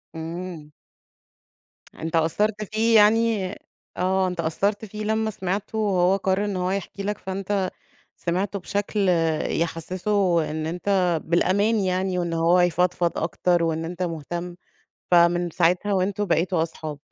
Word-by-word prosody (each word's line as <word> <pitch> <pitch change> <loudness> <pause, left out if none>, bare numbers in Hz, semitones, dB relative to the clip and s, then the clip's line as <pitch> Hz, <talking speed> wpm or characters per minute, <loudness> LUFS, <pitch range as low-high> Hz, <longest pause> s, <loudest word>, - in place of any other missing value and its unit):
إمم. 165 -1 -6 1.3
أنت 165 +1 -3
أثّرت 205 +7 +1
فيه 220 +2 +1
يعني 215 -2 +4 0.5
آه 185 +1 +1
أنت 180 -1 -5
أثرت 200 +7 0
فيه 215 +1 -7
لمّا 220 +1 0
سِمعته 195 +3 -3
وهو 190 -3 +3
قرر 195 +1 0
إن 200 -2 -2
هو 180 +1 -1
يحكي 200 0 -4
لك، 210 0 -2
فأنت 190 0 -2 0.5
سِمعته 190 +3 -2
بشكل 205 +1 -1 0.4
يحسسه 170 +1 0
إن 155 0 -3
أنت 180 -1 +1
بالأمان 200 +6 +2
يعني، 185 0 0
وإن 170 -1 -2
هو 165 +2 +3
يفضفض 175 0 +1
أكتر، 175 +1 +1
وإن 160 0 -1
أنت 175 +2 -5
مهتم، 175 +1 -4 0.6
فمن 175 0 +4
ساعتها 180 +4 +1
وأنتم 195 +2 0
بقيتم 175 0 +1
أصحاب. 160 -2 -3
185 Hz, 130 wpm, -24 LUFS, 170-200 Hz, 1.3 s, يعني